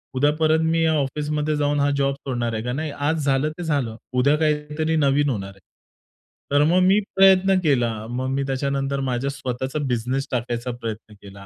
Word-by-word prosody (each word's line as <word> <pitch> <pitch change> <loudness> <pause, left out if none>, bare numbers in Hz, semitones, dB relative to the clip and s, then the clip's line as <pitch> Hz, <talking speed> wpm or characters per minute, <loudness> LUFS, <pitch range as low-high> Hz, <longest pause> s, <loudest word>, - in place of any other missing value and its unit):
उद्या 145 +3 +3
परत 160 0 +3
मी 165 0 +1
या 160 -1 +3
ऑफिसमध्ये 150 +2 -1
जाऊन 145 0 +1
हा 140 0 +2
जॉब 140 0 +1
सोडणार 120 -4 -3
आहे 110 0 -3
का? 125 - -3
नाही, 155 +3 -3
आज 145 +1 -1
झालं 135 +2 +2
ते 175 - -5
झालं, 140 -8 -1 0.2
उद्या 130 +4 +3
काहीतरी 150 +1 0
नवीन 145 -1 +2
होणार 100 -6 -3
आहे." 95 0 -17 0.9
तर 145 +1 +4
मग 180 +2 +4
मी 195 +2 +5 0.2
प्रयत्न 195 0 +5
केला. 125 -7 +2 0.2
मग 130 +2 -3
मी 135 +1 -1
त्याच्यानंतर 140 +1 -1
माझा 125 +2 -1
स्वतःचा 130 +1 -4
बिझनेस 125 +3 -1
टाकायचा 120 0 -2
प्रयत्न 115 -2 -7
केला. 100 0 -12
140 Hz, 185 wpm, -22 LUFS, 125-150 Hz, 0.9 s, मी